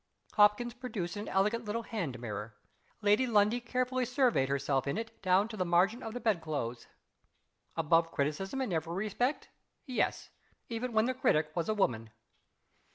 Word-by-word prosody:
Hopkins 210 +3 +4
produced 235 -9 -4
an 205 +1 -5
elegant 210 +5 +1
little 225 +2 -3
hand 170 - -4
mirror. 105 -2 -6 0.5
Lady 210 +5 +4
Lundie 215 +1 +3
carefully 255 +1 -1
surveyed 250 - +2
herself 140 -1 0
in 140 - -1
it 225 0 -6
down 190 +2 +3
to 225 - -8
the 185 - 0
margin 180 +7 +2
of 225 -1 -6
the - - -2
bedclothes. 155 - -2 0.9
Above 165 +1 +3
criticism 160 - -1
in 240 -8 -1
every 165 +1 -2
respect? 215 +8 -1 0.4
Yes 255 -4 -1 0.4
even 235 +2 -3
when 220 0 +4
the 255 - 0
critic 155 -11 +2
was 170 +1 -1
a 215 - +1
woman. 115 - 0
205 Hz, 160 wpm, -32 LUFS, 160-235 Hz, 0.9 s, Hopkins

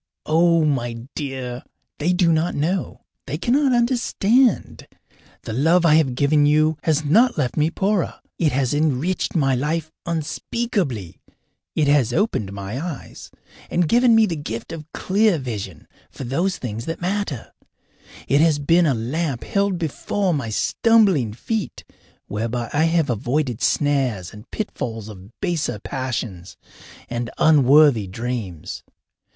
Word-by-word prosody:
Oh, 165 0 +3
my 120 -5 -1 0.2
dear, 130 -3 -5 0.4
they 160 +4 +1
do 175 -2 +3
not 160 +2 0
know, 170 +6 -2 0.3
they 145 +2 -3
cannot 265 - +2
understand. 240 -1 +1 0.6
The 110 - -5
love 165 +8 +3
I 160 - +5
have 150 -6 +3
given 145 +2 +3
you 155 +1 +2
has 155 -1 +1
not 230 - +4
left 130 -5 -1
me 155 +1 +2
poorer. 195 +1 -1 0.2
It 155 -4 +2
has 130 0 0
enriched 155 +5 0
my 135 -5 +2
life 155 +5 -1 0.2
unspeakably; 165 - -3 0.6
it 150 - +2
has 140 -5 +3
opened 165 - 0
my 100 +6 -5
eyes 170 -7 -7 0.4
and 175 -1 +1
given 240 +4 +4
me 225 -1 +6
the 175 -5 -2
gift 145 -2 -6
of 160 -1 -8
clear 200 -1 +2
vision 105 - -6 0.2
for - - -9
those 170 +9 -1
things 115 -1 -5
that 165 - -4
matter; 180 - -3 0.7
it 140 +2 +3
has 160 -2 +4
been 165 +4 +3
a 135 - +2
lamp 130 +2 -2
held 200 -2 0
before 180 +4 -1
my 140 -7 -2
stumbling 190 - +3
feet 210 - -4 0.4
whereby 115 +3 -3
I 150 +2 +3
have 165 -4 +1
avoided 120 +2 -1
snares 130 - 0
and 105 +3 -13
pitfalls 115 - -5
of 95 -2 -11
baser 170 - -1
passions 115 -7 -5 0.5
and 120 0 -3
unworthy 145 -6 +5
dreams. 105 -5 -5
150 Hz, 140 wpm, -22 LUFS, 125-175 Hz, 0.7 s, me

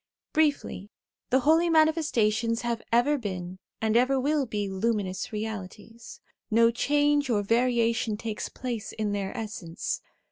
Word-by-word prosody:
Briefly, 290 -10 0 0.4
the 260 +1 +3
Holy 325 +5 +4
Manifestations 250 -9 +2
have 235 -1 -1
ever 275 +5 +3
been, 185 -4 -5 0.2
and 220 0 0
ever 260 +3 +3
will 285 0 +1
be, 205 -2 -2
Luminous 195 -1 -2
Realities; 220 +1 -7 0.3
no 230 +1 +5
change 290 +2 +2
or 210 -3 +1
variation 230 -1 +1
takes 220 -1 -4
place 240 -4 -5
in 215 -2 -2
their 200 -1 -2
essence. 205 -7 -4
230 Hz, 130 wpm, -27 LUFS, 210-265 Hz, 0.4 s, no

